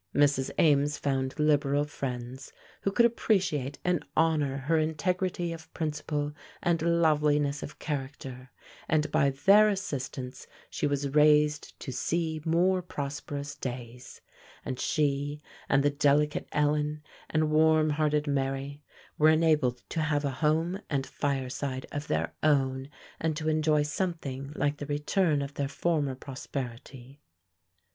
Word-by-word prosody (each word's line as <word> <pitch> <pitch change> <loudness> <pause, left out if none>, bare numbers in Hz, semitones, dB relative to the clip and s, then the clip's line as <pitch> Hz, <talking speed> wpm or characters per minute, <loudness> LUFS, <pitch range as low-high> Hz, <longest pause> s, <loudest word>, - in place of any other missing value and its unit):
Mrs. 140 -2 +3
Ames 145 -1 +3
found 135 -1 -1
liberal 145 -2 +2
friends, 130 -3 -6 0.3
who 195 - 0
could 235 +4 +5
appreciate 185 - +1
and 180 -3 +1
honor 150 -4 +2
her 155 +4 +1
integrity 175 +2 -1
of 165 -1 -11
principle 150 -1 -2 0.3
and 170 -2 +2
loveliness 150 -3 +2
of 145 - -8
character, 135 -3 -5 0.4
and 155 -1 +1
by 140 - +3
their 200 +10 +5
assistance 135 -10 -4 0.2
she - - -1
was 140 -1 -1
raised 150 0 +3
to 130 - -5
see 160 +2 -1
more 180 +3 +2
prosperous 145 -3 -5
days; 125 -1 -7 0.4
and 130 - -4
she, 145 -1 0 0.3
and 135 0 +4
the 145 - +3
delicate 145 +1 +2
Ellen, 150 0 0 0.3
and 155 -1 +1
warm 155 0 +4
hearted 150 0 +1
Mary 140 0 -2 0.4
were 155 +1 +6
enabled 155 -6 +2
to 165 - -1
have 150 -1 0
a 140 - 0
home 160 +6 0
and 135 -3 0
fireside 135 -1 -3
of 145 +1 -4
their - - -1
own, 135 -3 +1 0.3
and 160 -1 -1
to 155 0 -1
enjoy 155 -1 +2
something 145 -4 -3
like 145 0 0
the 145 - -6
return 150 +1 +1
of 140 0 -6
their 140 -1 -2
former 145 -2 0
prosperity. 130 0 -7
150 Hz, 135 wpm, -29 LUFS, 140-155 Hz, 0.4 s, were